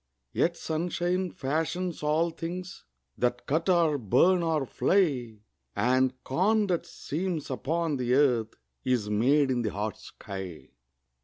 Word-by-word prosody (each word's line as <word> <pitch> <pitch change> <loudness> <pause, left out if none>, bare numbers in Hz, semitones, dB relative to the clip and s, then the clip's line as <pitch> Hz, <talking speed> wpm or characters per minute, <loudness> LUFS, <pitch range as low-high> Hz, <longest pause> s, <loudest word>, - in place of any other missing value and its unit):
Yet 170 0 +1
sunshine 175 +3 -1
fashions 165 +5 -2
all 155 +3 +1
things 175 +2 -6 0.3
That 125 0 0
cut 160 +5 0
or 165 -5 +3
burn 175 - +4
or 160 -4 0
fly; 125 - +1 0.3
And 130 +1 +2
corn 210 +10 +2
that 180 -4 -1
seems 165 -2 -4
upon 160 +3 -1
the 125 0 +1
earth 125 -6 +2 0.3
Is 120 -5 0
made 135 +6 +3
in 125 -1 +1
the 110 - -1
hot 105 +1 -3
sky. 95 -4 -8
150 Hz, 130 wpm, -28 LUFS, 125-170 Hz, 0.3 s, burn